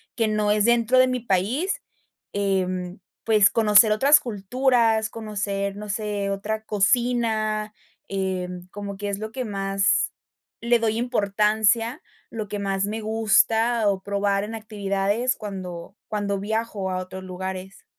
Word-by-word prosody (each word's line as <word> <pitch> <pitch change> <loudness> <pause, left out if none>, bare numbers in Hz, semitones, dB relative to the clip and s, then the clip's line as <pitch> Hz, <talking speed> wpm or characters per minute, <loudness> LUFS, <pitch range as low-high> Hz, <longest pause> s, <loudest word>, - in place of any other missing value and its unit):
que 225 -2 +1
no 215 -1 +1
es 210 0 +3
dentro 240 +1 +4
de 255 - +6
mi 255 0 -1
país, 235 - -1 0.5
em, 185 -2 -1 0.3
pues, 215 -3 +5
conocer 215 0 +5
otras 275 +8 +6
culturas, 230 -1 +1
conocer, 200 -3 -3
no 210 0 -8
sé, 205 -1 -2
otra 210 +2 -3
cocina, 215 0 +1 0.3
em, 180 -2 -3
como 200 0 -6
que 205 +1 -4
es 200 0 -3
lo 220 +1 -5
que 255 +2 -4
más 195 -1 +1 0.5
le 235 +1 +3
doy 225 -1 0
importancia, 225 - +1 0.3
lo 220 -2 -5
que 205 - -4
más 195 -1 -1
me 215 +2 -3
gusta, 225 +1 +2
o 195 -1 -1
probar 200 0 0
en 220 +2 -5
actividades 210 +2 -1
cuando 185 -3 -7
cuando 200 -2 -1
viajo 210 -2 -2
a 185 - -1
otros 185 +1 -6
lugares. 190 +1 -7
210 Hz, 140 wpm, -24 LUFS, 195-225 Hz, 0.5 s, de